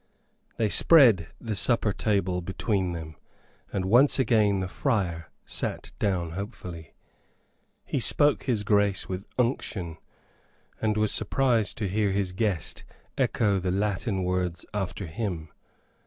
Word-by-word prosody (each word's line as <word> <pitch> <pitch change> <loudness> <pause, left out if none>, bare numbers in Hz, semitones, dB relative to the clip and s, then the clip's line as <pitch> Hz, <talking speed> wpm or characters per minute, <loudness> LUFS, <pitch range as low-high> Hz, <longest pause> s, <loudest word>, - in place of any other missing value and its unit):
They 110 - +2
spread 115 - +6
the 110 -2 -4
supper 110 0 +1
table 95 -4 0
between 95 +1 -1
them, 80 -2 -7 0.5
and 95 - -2
once 125 +9 +5
again 110 -6 +3
the 95 - -2
friar 90 - -1 0.2
sat - - -3
down 90 -5 0
hopefully. 90 - -7 0.9
He - - -1
spoke 145 -2 +2
his 115 -6 0
grace 100 -2 +2
with 95 +1 -5
unction, 100 - -1 0.8
and 110 -1 +1
was 105 -1 +2
surprised 120 -6 +1
to 105 - -1
hear 105 +2 +1
his 95 -1 -1
guest 95 -3 -2 0.3
echo 100 -4 +1
the 90 0 -2
Latin 100 +1 -1
words 90 -1 -1
after 100 -1 -3
him. 85 -3 -4
100 Hz, 125 wpm, -27 LUFS, 90-110 Hz, 0.9 s, spread